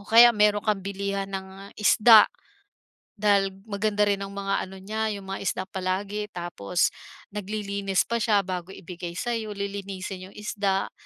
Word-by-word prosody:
kaya 235 +1 +9
meron 210 -1 +3
kang 210 -2 +1
bilihan 200 0 -3
ng 195 +1 -8
isda, 215 +1 +7 1.0
dahil 200 -2 +3 0.2
maganda 205 0 0
rin 205 -1 +2
ang 195 0 -6
mga 195 0 -1
ano 190 - -11
niya, 215 +2 -2
'yong 200 - -8
mga 195 0 -5
isda 185 - -1
palagi, 195 +3 -2
tapos 175 - -1 0.4
naglilinis 200 -1 -1
pa 235 0 -2
siya 210 -2 +3
bago 185 0 -5
ibigay 170 0 -8
sa'yo, 225 0 -3
lilinisin 195 -2 -5
'yong 195 - -17
isda. 200 -2 -1
200 Hz, 145 wpm, -26 LUFS, 190-210 Hz, 1.0 s, kaya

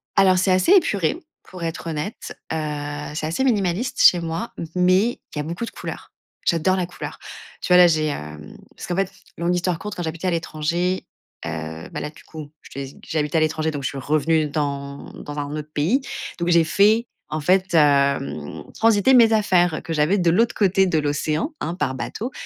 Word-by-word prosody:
Alors 190 -2 +5
c'est 185 +1 +2
assez 185 - +3
épuré, 205 - +3 0.3
pour 180 -2 -10
être 165 0 -4
honnête, 165 +8 -5 0.2
heu, 150 -2 -4
c'est 155 - -2
assez 165 +11 -1
minimaliste 210 -1 0
chez 180 - +7
moi. 165 0 -4 0.2
Mais 185 +4 +4 0.3
il - - -5
y - - 0
a - - -1
beaucoup 170 +9 -4
de - - -8
couleurs, - - -8 0.3
j'adore 170 +3 +2
la 185 -2 0
couleur. 180 - -8 0.4
Tu - - -4
vois, 180 - +6
là 180 -1 +8
j'ai 155 -2 +1
hem 75 - -7 0.2
parce - - -8
qu'en 175 - -2
fait 195 0 0 0.3
longue 170 +1 0
histoire 180 -1 0
courte, 210 +4 -6
quand 175 - -4
j'habitais 165 +3 -3
à - - +2
l'étranger, 170 +2 -1 0.4
heu, 80 -1 -6
bah - - -4
là - - -4
du 150 - -17
coup, 155 -2 -10
je - - -15
te - - -7
laisse 135 0 -6
j'habite 150 -1 -2
à - - +5
l'étranger, 155 0 0
donc 145 -2 -5
je - - 0
suis 140 - -7
revenue 155 +3 +1
dans 140 -1 -4
dans 145 0 -8
un 145 +1 -4
autre 150 0 -6
pays. 180 - +1 0.4
Donc 170 - -1
j'ai 170 -1 +5
fait 210 +8 +3 0.2
en 155 - -3
fait 185 +3 +2
hem, 140 -3 +2
transiter 225 +2 +4
mes 230 -3 +6
affaires, 180 -6 +3
heu, - - -5
que 165 - -5
j'avais 155 +6 +2
de 175 -3 +3
l'autre 230 +7 +2
côté 195 -1 +3
de 165 - +1
l'océan, 150 - -1
hein, 165 +3 -3
par 130 -7 -1
bateau. 225 - -5
165 Hz, 210 wpm, -22 LUFS, 150-185 Hz, 0.4 s, là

